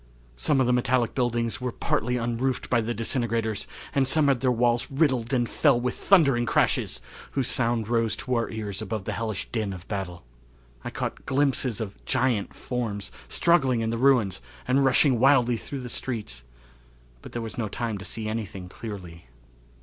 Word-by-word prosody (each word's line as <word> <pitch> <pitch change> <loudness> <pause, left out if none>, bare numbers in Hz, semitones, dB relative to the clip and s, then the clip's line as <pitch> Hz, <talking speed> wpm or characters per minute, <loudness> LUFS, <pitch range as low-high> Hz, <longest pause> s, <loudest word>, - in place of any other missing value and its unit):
Some - - +1
of 130 - +4
the 125 - +3
metallic 125 -1 +2
buildings 120 -2 0
were 125 -1 -1
partly 125 +2 0
unroofed 120 +2 -1
by 120 -2 +4
the 115 +2 -2
disintegrators 115 -2 -1 0.3
and 135 -2 +3
some 145 +1 +4
had 135 -3 +3
their 130 0 +2
walls 120 0 +2
riddled 135 -4 +1
and 120 -3 +2
fell 120 - +3
with 125 0 -1
thundering 140 -11 +4
crashes, - - +1 0.3
whose 135 -3 0
sound 115 -3 0
rose 115 -2 +1
to 130 -4 -3
our 115 -1 +1
ears 105 -2 -4
above 110 -1 -3
the - - -3
hellish 110 -3 -3
din 110 -4 -1
of 90 -1 -10
battle. 95 - -4 0.6
I - - -4
caught - - -5
glimpses 135 -4 +1
of 105 -3 -6
giant 125 -6 0
forms 110 -5 -3 0.2
struggling 135 -9 +3
in 110 0 0
the 115 - -1
ruins 120 - +3 0.3
and 135 +2 +3
rushing 135 -1 +4
wildly 125 -2 +5
through 135 +4 -5
the 125 - -6
streets, 105 - -4 0.8
but - - -11
there 120 - -2
was 115 +1 -6
no 110 - 0
time 110 0 -3
to - - -8
see 110 0 -4
anything 100 -4 -4
clearly. 90 - -8
120 Hz, 180 wpm, -26 LUFS, 110-130 Hz, 0.8 s, wildly